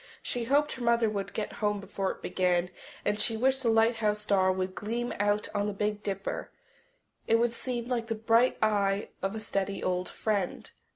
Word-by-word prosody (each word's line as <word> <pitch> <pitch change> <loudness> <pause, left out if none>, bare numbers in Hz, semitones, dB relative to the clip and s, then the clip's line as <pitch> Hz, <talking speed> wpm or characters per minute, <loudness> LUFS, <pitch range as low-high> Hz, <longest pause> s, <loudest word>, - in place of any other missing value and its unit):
She 240 -1 -2
hoped 290 +4 +3
her 250 - -5
mother 235 -1 +3
would 195 -2 -3
get 215 - -3
home 210 -1 +1
before 195 -1 -2
it - - -6
began, 180 -1 +1 0.3
and 205 0 +1
she 225 +1 0
wished 265 +3 +2
the 240 - +2
lighthouse 225 -2 +3
star 195 -3 +3
would 185 0 -2
gleam 235 +5 -3
out 205 +1 +1
on 205 0 0
the 210 - -2
Big 210 +1 -1
Dipper. 195 -1 -3 0.8
It 225 - +5
would 235 +1 +3
seem 240 0 -4
like 240 -2 -1
the 225 - -1
bright 230 +3 +3
eye 200 -1 +2
of 195 +3 -1
a - - -3
steady 200 -2 -2
old 180 0 0
friend. 205 -4 -2
210 Hz, 190 wpm, -29 LUFS, 195-230 Hz, 0.8 s, It